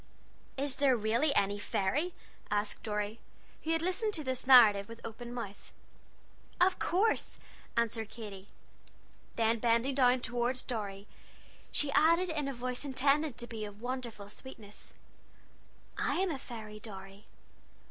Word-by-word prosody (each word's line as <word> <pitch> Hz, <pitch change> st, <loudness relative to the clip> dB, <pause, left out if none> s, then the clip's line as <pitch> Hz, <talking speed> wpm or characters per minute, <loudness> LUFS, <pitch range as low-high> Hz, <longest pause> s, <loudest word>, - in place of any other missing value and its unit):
"Is 275 Hz, 0 st, -1 dB
there 270 Hz, -3 st, +4 dB
really 230 Hz, +7 st, +2 dB
any 200 Hz, +1 st, +2 dB
fairy?" 265 Hz, -, 0 dB, 0.3 s
asked 205 Hz, 0 st, -1 dB
Dorry, 210 Hz, 0 st, -2 dB, 0.4 s
who 315 Hz, -, -4 dB
had 325 Hz, 0 st, +1 dB
listened 405 Hz, +4 st, 0 dB
to 310 Hz, -, -3 dB
this 260 Hz, -1 st, -3 dB
narrative 220 Hz, -6 st, +8 dB
with 230 Hz, 0 st, -9 dB
open 235 Hz, +2 st, -7 dB
mouth. 220 Hz, -5 st, -7 dB, 0.9 s
"Of 365 Hz, +1 st, +4 dB
course," 405 Hz, +6 st, +1 dB, 0.4 s
answered 230 Hz, -2 st, 0 dB
Katy. 205 Hz, -4 st, -9 dB, 0.9 s
Then 225 Hz, 0 st, +2 dB
bending 235 Hz, +3 st, +2 dB
down 255 Hz, -1 st, +4 dB
toward 245 Hz, +1 st, -1 dB
Dorry, 205 Hz, -5 st, -4 dB, 0.7 s
she 290 Hz, -1 st, +1 dB
added 335 Hz, +5 st, +4 dB
in 300 Hz, -3 st, -1 dB
a -, -, -1 dB
voice 250 Hz, +2 st, -3 dB
intended 280 Hz, 0 st, +2 dB
to 240 Hz, -, -3 dB
be 225 Hz, -2 st, -6 dB
of 205 Hz, +1 st, -8 dB
wonderful 245 Hz, -5 st, -4 dB
sweetness: 210 Hz, -2 st, -11 dB, 1.1 s
"I -, -, +1 dB
am 375 Hz, -1 st, +1 dB
a 280 Hz, -, -3 dB
fairy, 215 Hz, -4 st, -8 dB
Dorry!" 195 Hz, -1 st, -10 dB
240 Hz, 135 wpm, -32 LUFS, 215-275 Hz, 1.1 s, narrative